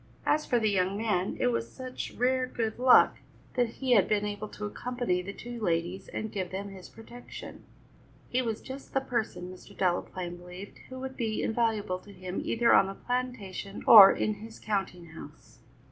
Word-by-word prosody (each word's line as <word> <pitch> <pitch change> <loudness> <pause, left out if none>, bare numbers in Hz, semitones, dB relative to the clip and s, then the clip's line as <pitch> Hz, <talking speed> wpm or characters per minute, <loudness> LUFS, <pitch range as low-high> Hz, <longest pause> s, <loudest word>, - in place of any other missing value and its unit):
As 305 0 +2
for 245 - +2
the 215 -2 +2
young 190 0 +1
man, 205 -4 -1
it - - +3
was 115 0 -2
such 255 -1 -6
rare 255 +1 +2
good 225 -2 -3
luck 255 0 +6 0.3
that 245 -2 +2
he 255 +3 -4
had 200 -6 +5
been 210 -1 +1
able 205 +1 -4
to 210 - -7
accompany 240 -4 -2
the 190 +2 -6
two 240 +3 -8
ladies 175 0 -1
and 220 - -5
give 185 -3 -3
them 195 +2 -5
his 190 -2 -11
protection. 240 +2 -11 0.6
He 255 - 0
was 225 -3 -3
just 270 +1 -9
the 270 - +3
person, 225 -8 -3
Mr. 195 +2 -15
Delaplaine 175 -1 -1
believed, 180 +3 -10
who 260 0 -7
would 265 0 -6
be 220 -2 -1
invaluable 220 -5 0
to 205 - -15
him 185 -1 -5
either 235 0 +3
on 190 - +6
the 195 - -6
plantation 240 -6 -4
or 205 -4 +11
in 215 - 0
his 220 +2 -11
counting 195 -4 -3
house. 150 -4 -13
210 Hz, 185 wpm, -29 LUFS, 185-240 Hz, 0.6 s, or